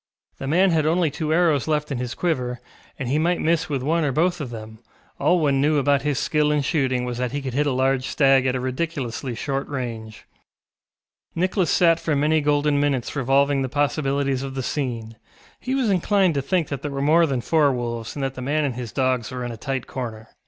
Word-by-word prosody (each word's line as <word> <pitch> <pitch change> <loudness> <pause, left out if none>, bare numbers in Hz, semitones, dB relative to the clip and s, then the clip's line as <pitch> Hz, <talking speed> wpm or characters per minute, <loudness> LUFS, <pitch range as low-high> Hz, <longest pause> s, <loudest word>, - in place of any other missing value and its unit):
The 135 - -5
man 180 +6 +3
had 155 -2 +2
only 165 -1 +2
two 155 +1 -3
arrows 160 -4 +2
left 150 -1 -1
in 130 - -2
his 125 -2 -4
quiver, 125 -8 -1 0.4
and 130 - -4
he 140 +5 +1
might 175 +2 +1
miss 165 0 +1
with 135 -3 -2
one 165 +4 +1
or 145 - +1
both 175 +4 +1
of 135 - -4
them; 110 -1 -9 0.4
all 180 - +3
one 140 -4 +2
knew 150 +1 +3
about 140 0 +2
his 145 -1 -1
skill 150 +1 +1
in 150 -1 +1
shooting 130 -4 0
was 120 -1 -4
that 125 0 -2
he 145 - -1
could 135 -3 -5
hit 145 +3 +1
a - - +1
large 130 0 +1
stag 135 -2 +3
at 130 - +1
a - - -1
ridiculously 130 -2 -3
short 135 +3 -3
range. 115 -5 -6 1.1
Nicholas 185 0 +1
sat 170 -2 +4
for 165 -2 -1
many 155 +2 +2
golden 145 0 +2
minutes 140 -3 -1
revolving 140 +1 +2
the 130 - -2
possibilities 140 -1 0
of 135 -1 -6
the 130 - -3
scene; 115 -5 -3 0.4
he 260 +1 -2
was 250 -6 +1
inclined 190 -1 +2
to 140 - 0
think 165 +3 0
that 140 -3 -4
there 145 - -3
were 140 -1 -4
more 160 +4 +4
than 135 -3 -1
four 150 +2 +2
wolves 120 -2 -4
and 140 - -3
that 135 -1 -2
the 130 - -8
man 145 +4 0
and 135 - -1
his 120 -2 -6
dogs 130 -3 0
were 125 -2 -5
in 120 - -4
a - - -6
tight 135 +2 -4
corner. 115 -4 -6
140 Hz, 225 wpm, -23 LUFS, 130-155 Hz, 1.1 s, sat